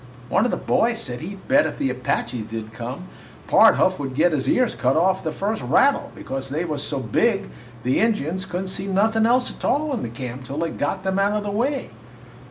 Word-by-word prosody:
One 205 - +3
of - - +1
the - - -1
boys 230 +1 +1
said 125 - -4
he 190 +5 -6
'd 190 - -17
bet 285 +2 +4
if - - -6
the 135 - 0
Apaches 125 -3 -2
did 110 -1 -6
come, 125 +9 -6 0.4
Pard - - +6
Huff 185 -3 +2
would 135 -2 -4
get 170 +5 +4
his 145 -4 0
ears 255 -2 +2
cut 130 +1 +1
off 185 +4 +2
the 160 - -2
first 205 +7 -2
rattle, 280 +1 +2
because 135 0 -5
they 155 +5 -2
was 150 -4 -3
so 140 -1 -1
big 195 - +1 0.3
the 130 +1 +2
Injuns 190 -4 0
could 180 +1 -3
n't 190 - -5
see 190 +1 -4
nothin' 220 +3 +2
else 250 +1 +2
a - - -10
tall 295 +2 0
in 225 - -3
camp 125 +2 -7
till 140 +3 -6
they 165 +1 -1
got 185 +6 -2
them 190 0 0
out 200 +1 +2
of 210 - -3
the 205 - -3
way. 260 +6 -1
185 Hz, 230 wpm, -23 LUFS, 135-215 Hz, 0.4 s, Pard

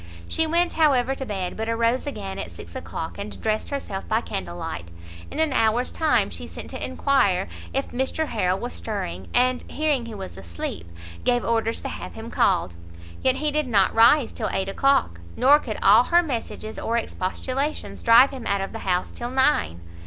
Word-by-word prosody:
She 320 - +1
went, 340 +2 +2
however, 270 -5 +3
to 265 -1 -6
bed, 190 -4 -3
but 220 +1 -3
arose 230 +4 +1
again 195 -7 -5
at - - -5
six - - -12
o'clock, 200 -9 -6
and 200 +1 -6
dressed 215 0 -1
herself 240 -9 -4
by 220 +1 +1
candle 85 - -5
light. 85 0 -5 0.4
In - - -8
an 315 -3 +2
hour's 225 +1 +2
time 315 -2 +2
she - - -6
sent - - -8
to - - -5
enquire 200 -10 +2 0.2
if 270 +1 -2
Mr 265 +5 -1
Harrel 185 -4 +1
was 240 +5 -5
stirring, 95 - -4
and 250 +1 +2
hearing 290 -5 0
he 225 - -7
was 190 - -7
asleep, 85 -1 -6 0.4
gave 245 -1 +2
orders 225 0 0
to - - -4
have 90 -2 -7
him - - -8
called. 90 - +2 0.5
Yet 260 0 +3
he 300 +2 0
did 300 -1 0
not 200 -5 +3
rise 235 +4 +5
till - - -2
eight 195 0 -1
o'clock, 195 - +2 0.2
nor 285 +3 +6
could 225 -7 -5
all 215 +5 +7
her 345 +1 +4
messages 230 -6 -4
or 230 - -1
expostulations 255 +8 -3
drive 235 +3 +7
him 260 -4 -6
out 200 -1 +1
of 195 - -4
the 225 - -6
house 180 -3 -1
till 240 - -5
nine. 100 - +2
230 Hz, 190 wpm, -24 LUFS, 195-270 Hz, 0.5 s, all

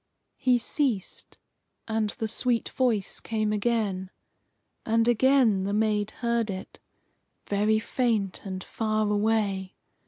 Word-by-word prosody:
He 250 -2 +4
ceased, 240 - -2 0.5
and 220 -1 0
the 220 +2 -3
sweet 235 +1 0
voice 230 -7 0
came 215 -2 -1
again. 205 -4 0 0.7
And 225 +1 +2
again 240 -4 +4
the 200 +1 -1
maid 210 -1 +1 0.2
heard 235 -2 +1
it, 190 -1 -7 0.7
very 210 +2 +2
faint 220 -4 -1
and 185 -2 -5
far 215 -1 -1
away. 205 -3 0
215 Hz, 115 wpm, -27 LUFS, 205-230 Hz, 0.7 s, He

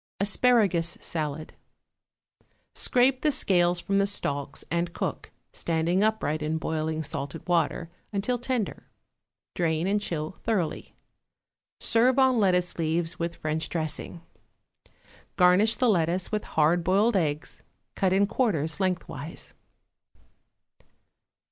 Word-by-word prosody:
=Asparagus 200 -5 +3
Salad.= 155 -1 -4 1.2
Scrape 255 +1 +2
the 305 - +2
scales 175 -8 +2
from 195 +3 0
the 200 - +2
stalks, 140 -8 -2
and 170 0 -1
cook, - - -4 0.2
standing 170 +3 0
upright 215 -9 0
in 155 +1 -1
boiling 160 0 -2
salted 145 +3 -5
water, 170 -1 0 0.2
until 215 +5 -1
tender; 245 -3 -3 0.7
drain 165 -1 0
and 205 +2 +1
chill 165 -3 -4
thoroughly. 195 -8 -2 0.8
Serve 240 +3 +3
on 260 -3 +4
lettuce 180 -3 +1
leaves 165 +1 -1
with 170 0 -2
French 155 +1 -3
dressing. 160 +1 -3 1.1
Garnish 185 +4 +5
the 255 - +1
lettuce 175 -3 +1
with 215 -1 -2
hard 160 +3 +2
boiled 205 +6 +2
eggs 150 -5 -2 0.3
cut 190 -2 +1
in 195 +2 +4
quarters 195 - -1
lengthwise. 180 -4 -4
175 Hz, 110 wpm, -27 LUFS, 160-205 Hz, 1.2 s, Garnish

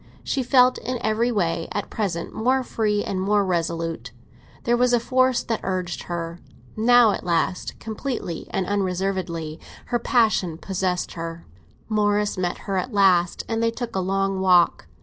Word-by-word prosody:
She 275 - -1
felt 250 0 +4
in 250 +2 -3
every 220 +3 +1
way 170 -6 0
at - - -4
present 180 -6 -3
more 255 +4 +1
free 210 -4 0
and 185 -1 -2
more 205 +1 +2
resolute; 165 -2 -2 0.5
there 240 - +2
was 245 0 +2
a 240 - +5
force 255 +1 +2
that 225 - -2
urged 185 -2 -3
her. 170 -1 -4 0.4
Now 235 0 +5
at - - -4
last, 175 +1 -1
completely 225 - -4
and 190 - -1
unreservedly, 185 -4 -2 0.3
her 240 - +3
passion 215 - +2
possessed 185 0 -2
her. 165 0 -6 0.4
Morris 210 -1 +1
met 180 -2 -2
her 195 -2 -1
at 250 +8 -2
last, 180 -3 +3
and 225 0 -1
they 230 - +3
took 235 -1 -5
a - - +1
long 195 +1 0
walk. 180 - +4
195 Hz, 160 wpm, -23 LUFS, 175-230 Hz, 0.5 s, a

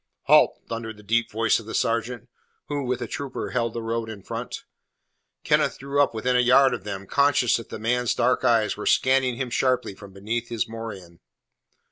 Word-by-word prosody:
"Halt!" - - +5
thundered 115 -1 -5
the 105 - -15
deep 115 +3 +1
voice 115 +1 +1
of 110 - -12
the 110 - -5
sergeant, 115 +1 -1 0.4
who, 145 -1 -2
with 125 0 -2
a - - -5
trooper, 140 -3 -5
held 115 -2 -1
the 115 - -4
road 115 0 -3
in 105 -4 -9
front. - - -6 0.8
Kenneth - - +2
drew 140 +1 0
up 140 - +3
within 125 +3 0
a - - +4
yard 125 +2 +5
of 120 - -5
them, 100 -2 -5
conscious 140 -1 +3
that 115 - -9
the - - -6
man's 120 +2 0
dark 125 +1 +1
eyes 115 -3 +2
were 105 - -5
scanning 130 -1 +3
him 125 -1 -4
sharply 130 -4 0
from 100 0 -13
beneath 110 +5 -4
his 115 0 -2
morion. 105 -7 -8
115 Hz, 195 wpm, -24 LUFS, 110-125 Hz, 0.8 s, Halt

